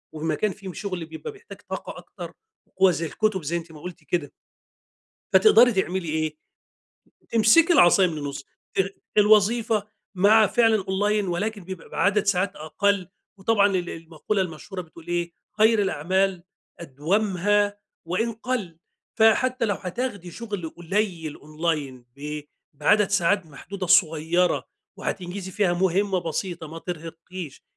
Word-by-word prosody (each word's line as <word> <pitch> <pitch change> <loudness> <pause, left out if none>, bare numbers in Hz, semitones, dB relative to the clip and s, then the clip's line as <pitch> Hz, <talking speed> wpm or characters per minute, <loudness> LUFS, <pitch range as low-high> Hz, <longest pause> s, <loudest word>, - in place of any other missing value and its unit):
ومكان 160 +6 -1
فيه 190 -1 -9
شغل 185 -5 -4
بيبقى 160 - -8
بيحتاج 425 +2 -13
طاقة - - -6
أكتر، - - -10 0.5
هو 190 -1 +7
زي 165 0 -2
الكتب 195 +2 -1
زي 165 +4 -1
أنتِ 165 -1 -8
ما 150 - -12
قُلتِ 180 +1 -9
كده. 170 -5 -2 1.0
فتقدري 245 - +7
تعملي 190 -3 -1
إيه؟ 155 0 -2 0.9
تمسكي 230 +10 +5
العصايا 185 - +6
من 160 -3 -5
النص. 140 -2 -5 0.3
ال 195 +1 0 0.2
الوظيفة 215 +1 +4 0.3
مع 210 +3 +6
فعلًا 225 -3 +3
أونلاين 205 +1 +1
ولكن 200 +3 -2
بيبقى 185 -1 -5
عدد 205 +1 +3
ساعات 195 0 +1
أقل، 190 +4 0 0.3
وطبعًا 205 0 +3
ال 185 -3 -1
المقولة 165 +5 -3
المشهورة 180 +2 -5
بتقول 165 -1 -15
إيه، 175 0 -1 0.3
خير 220 0 +5
الأعمال 190 +1 0 0.4
أدومّها 200 +6 0 0.3
وإن 225 +7 -1
قل، 225 -8 -4 0.4
فحتى 245 +3 +4
لو 205 -3 0
هتاخدي 195 -2 -4
شغل 205 -5 -5
قليل 175 -3 -2
أونلاين 150 -5 -3
ب 150 +1 -5 0.3
بعدد 210 +6 +3
ساعات 195 -1 +2
محدودة 185 +5 -7
صغيرة 170 0 +3 0.3
وهتنجزي 185 +1 -5
فيها 185 -2 +1
مهمة 190 +2 +1
بسيطة 170 0 -4
ما 165 +2 -8
ترهقّيش، 165 -1 -8
185 Hz, 130 wpm, -24 LUFS, 165-205 Hz, 1.0 s, هو